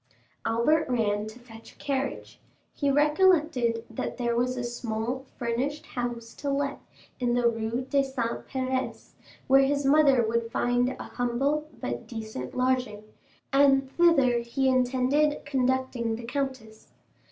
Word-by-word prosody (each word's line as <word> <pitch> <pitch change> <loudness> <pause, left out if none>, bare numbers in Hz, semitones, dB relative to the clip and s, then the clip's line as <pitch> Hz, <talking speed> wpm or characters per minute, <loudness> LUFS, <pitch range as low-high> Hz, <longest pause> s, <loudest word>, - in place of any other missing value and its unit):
Albert 280 +8 +2
ran 210 -4 0
to 215 +2 -10
fetch 230 -2 -14
a - - -26
carriage. 275 -1 -3 0.3
He 285 - 0
recollected 295 -6 +3
that 225 - -5
there 240 -2 0
was 250 +2 0
a 245 - -2
small 240 +2 -3
furnished 255 +5 -2
house 240 -2 -5
to 285 - -2
let 275 0 -1 0.4
in 245 -1 +1
the 245 -1 +3
Rue 230 +2 -1
des 275 0 +2
Saints 245 -4 -3
Pères, 260 -1 -3 0.3
where 270 +1 +6
his 280 +1 +1
mother 275 -4 +5
would 230 0 -1
find 245 +1 +1
a - - -5
humble 275 +5 -1
but 120 0 -4
decent 220 - -6
lodging, 255 -4 0 0.5
and 275 -1 +4
thither 275 -9 +4
he 235 +3 -1
intended 260 +4 +2
conducting 260 -4 0
the 235 - -8
countess. 255 -4 -4
255 Hz, 140 wpm, -27 LUFS, 235-275 Hz, 0.5 s, where